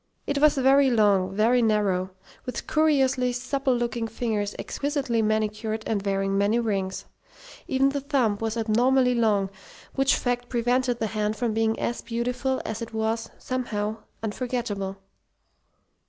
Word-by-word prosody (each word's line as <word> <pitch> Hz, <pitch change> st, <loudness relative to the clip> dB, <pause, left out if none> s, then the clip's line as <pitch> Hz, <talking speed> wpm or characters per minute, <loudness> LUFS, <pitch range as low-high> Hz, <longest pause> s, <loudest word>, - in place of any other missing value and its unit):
It 285 Hz, 0 st, -1 dB
was 305 Hz, 0 st, +5 dB
very 270 Hz, +1 st, +5 dB
long, 200 Hz, -5 st, +3 dB
very 235 Hz, +4 st, +3 dB
narrow, 205 Hz, -4 st, +1 dB, 0.3 s
with 250 Hz, -, -5 dB
curiously 270 Hz, -5 st, +2 dB
supple 265 Hz, +1 st, 0 dB
looking 235 Hz, -1 st, -2 dB
fingers 215 Hz, -2 st, -2 dB
exquisitely 275 Hz, -5 st, -1 dB
manicured 215 Hz, 0 st, -1 dB
and 205 Hz, -3 st, -1 dB
wearing 195 Hz, -1 st, 0 dB
many 200 Hz, +3 st, +2 dB
rings. 195 Hz, -5 st, -2 dB, 0.6 s
Even 270 Hz, +1 st, +3 dB
the 280 Hz, 0 st, -2 dB
thumb 260 Hz, -8 st, +1 dB
was 225 Hz, 0 st, -2 dB
abnormally 250 Hz, +3 st, +3 dB
long, 210 Hz, -5 st, +1 dB, 0.4 s
which 270 Hz, +1 st, +3 dB
fact 245 Hz, -1 st, -2 dB
prevented 245 Hz, 0 st, +1 dB
the 225 Hz, -, -1 dB
hand 215 Hz, 0 st, -1 dB
from 230 Hz, 0 st, -1 dB
being 225 Hz, 0 st, +1 dB
as 235 Hz, -, -2 dB
beautiful 250 Hz, +3 st, -2 dB
as 220 Hz, +1 st, -4 dB
it 230 Hz, -1 st, -6 dB
was, 220 Hz, +1 st, -1 dB
somehow, 220 Hz, -4 st, -3 dB, 0.3 s
unforgettable. 210 Hz, -4 st, -3 dB
230 Hz, 140 wpm, -25 LUFS, 215-255 Hz, 0.6 s, was